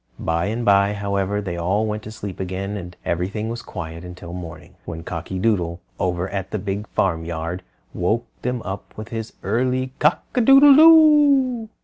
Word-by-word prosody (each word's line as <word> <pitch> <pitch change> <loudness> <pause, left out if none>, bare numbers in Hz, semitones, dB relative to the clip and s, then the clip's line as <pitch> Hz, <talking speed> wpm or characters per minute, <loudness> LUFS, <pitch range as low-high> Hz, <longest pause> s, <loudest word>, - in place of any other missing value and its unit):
By 85 +1 -1
and 115 +3 -3
by, 100 0 +4
however, 100 0 -1
they 90 -4 -5
all 95 +6 0
went 105 0 -3
to 110 - -9
sleep 100 -4 -7
again, 95 +2 -4
and 90 -3 -8
everything 95 +6 -2
was 120 +1 -5
quiet 85 -2 -7
until 90 -1 -9
morning, 85 -3 -9
when 80 -1 -7
Cocky 85 +2 -5
Doodle 90 -5 0 0.2
over 90 0 -1
at 95 -1 -4
the 105 - -3
Big 100 +1 -4
Farmyard 85 -1 -2 0.3
woke 110 +7 0 0.2
them 125 -1 -3
up 95 0 -7
with 110 0 -7
his 115 -1 -5
early 130 +4 0
Cock - - +2
a 250 - +2
doodle 275 +3 +8
do. 290 -7 +6
100 Hz, 170 wpm, -21 LUFS, 90-115 Hz, 0.3 s, doodle